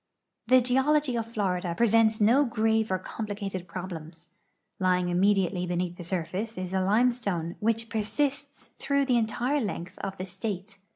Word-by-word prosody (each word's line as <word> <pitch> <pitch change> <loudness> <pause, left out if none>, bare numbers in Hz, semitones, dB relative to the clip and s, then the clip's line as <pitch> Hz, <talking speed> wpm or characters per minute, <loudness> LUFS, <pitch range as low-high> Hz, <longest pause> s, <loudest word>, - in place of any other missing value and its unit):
The 255 +1 +6
geology 265 +2 +2
of 230 -1 -3
Florida 180 -5 -1
presents 225 -1 +4
no 235 +7 +5
grave 220 -3 +1
or 185 - +2
complicated 200 -2 -5
})rob 185 +1 -4
lems. 165 0 -9 0.5
Lying 180 -1 +2
immediately 185 0 +2
beneath 175 0 -2
the 175 - -7
surface 185 +5 -3
is 185 0 -4
a 190 - +2
limestone 200 -5 +1
which 225 +1 0
persists 230 +6 -2
througli 280 -1 +1
the 250 -2 +3
entire 240 +5 0
length 185 -4 -5
of 195 -1 -5
the 185 - -4
state. 195 +1 -5
205 Hz, 155 wpm, -28 LUFS, 180-230 Hz, 0.5 s, The